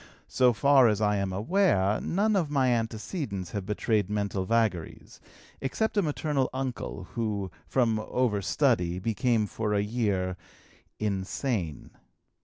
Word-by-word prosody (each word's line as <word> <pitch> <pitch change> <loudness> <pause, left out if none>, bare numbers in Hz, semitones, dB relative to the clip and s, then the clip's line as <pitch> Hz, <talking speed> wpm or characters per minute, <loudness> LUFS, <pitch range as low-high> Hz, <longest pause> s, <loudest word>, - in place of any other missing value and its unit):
So 125 -1 +4
far 135 +2 +5
as 105 -2 +1
I 105 -1 +2
am 100 -1 -1
aware, 105 - +2
none 210 +4 +1
of 170 -6 +1
my 135 -3 +2
antecedents 115 - -2
have 100 -3 -4
betrayed 105 -1 0
mental 100 -2 -1
vagaries, 110 -6 -1 0.4
except 220 +13 -1
a 205 - +4
maternal 150 -4 0
uncle, 130 -7 -4
who, 105 -5 -2 0.2
from 115 -4 +2
overstudy, 100 -6 +1
became 115 +2 +1
for 105 +1 -2
a 100 - +2
year 100 -5 -1 0.6
insane. 100 - -2
110 Hz, 125 wpm, -28 LUFS, 100-130 Hz, 0.6 s, far